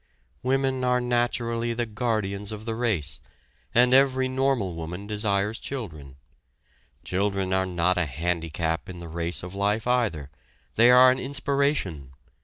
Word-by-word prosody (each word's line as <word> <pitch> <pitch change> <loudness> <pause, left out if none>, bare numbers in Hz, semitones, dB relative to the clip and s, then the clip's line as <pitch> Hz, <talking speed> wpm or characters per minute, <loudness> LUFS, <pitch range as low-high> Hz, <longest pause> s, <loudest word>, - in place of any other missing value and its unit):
Women 135 0 0
are 125 0 +2
naturally 120 -1 -1
the 120 0 -1
guardians 105 -3 -2
of 110 0 -7
the 115 - -2
race, 105 -11 -1 0.5
and 125 +1 +4
every 130 -1 +4
normal 130 -7 0
woman 85 +4 -6
desires 105 0 0
children. 80 - -7 0.9
Children 95 0 -1
are 95 0 +1
not 90 +1 +1
a 90 - +2
handicap 80 +2 -2
in 90 -2 -8
the 85 - -8
race 85 +2 -2
of 90 +1 -7
life 105 +3 0
either, 105 - 0 0.4
they 120 +2 +5
are 125 +1 +8
an 130 - -1
inspiration. 135 - -1
105 Hz, 140 wpm, -25 LUFS, 90-125 Hz, 0.9 s, are